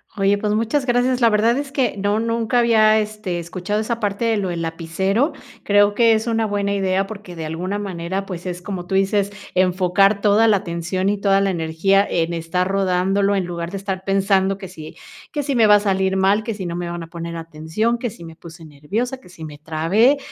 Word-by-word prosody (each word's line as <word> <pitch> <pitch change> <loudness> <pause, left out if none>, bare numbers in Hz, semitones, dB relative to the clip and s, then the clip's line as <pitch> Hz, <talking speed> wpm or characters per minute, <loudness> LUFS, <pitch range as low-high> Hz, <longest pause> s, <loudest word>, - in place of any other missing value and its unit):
Oye, 200 0 +2
pues, 210 0 -1
muchas 230 +6 0
gracias. 250 +1 +1
La 230 - +6
verdad 225 +3 +3
es 285 -1 -4
que 270 -3 0
no 205 +2 0
nunca 230 +1 0
había, 220 -2 +4
eh, - - +2
este, 210 -4 -4
escuchado 185 +5 -3
esa 230 +1 -3
parte 205 +1 -1
de 225 -1 +2
lo 195 -2 -1
del 170 -1 -3
lapicero. 190 - -1 0.3
Creo 205 0 +3
que 230 0 +5
es 220 +1 -1
una 225 -1 +1
buena 200 -1 -1
idea, 195 0 0
porque, 200 -4 -9
de 160 -1 -5
alguna 180 +6 -3
manera, 190 0 -4
pues, 180 -1 -7
es 180 -1 -5
como 180 -2 -5
tú 185 - -6
dices, 195 +1 +1 0.2
enfocar 185 +2 +3
toda 210 +2 +4
la 210 -2 +4
atención 185 +1 -2
y 205 - 0
toda 195 -1 +3
la 195 - +1
energía 180 +3 +1
en 170 0 -1
estar 170 +2 -1
rodándolo, 195 +1 +1
en 190 -2 0
lugar 170 -1 -5
de 195 - -4
estar 190 -1 -4
pensando 195 0 +1
que 190 - -7
si 160 -4 -11 0.4
que 295 - -2
si 280 -1 -2
me 230 -2 +5
va 210 -1 +7
a - - +5
salir 190 -2 0
mal, 195 +3 +2
que 225 - -3
si 195 -3 -5
no 170 - -4
me 175 0 -4
van 175 0 -5
a 165 - -8
poner 170 0 -7
atención, 165 +8 -2
que 235 -1 -4
si 170 - -13
me 165 -1 -10
puse 165 0 -13
nerviosa, 205 - -4
que 255 - -18
si 165 -2 -12
me 150 -1 -9
trabé, 165 - +2
195 Hz, 225 wpm, -20 LUFS, 175-215 Hz, 0.4 s, va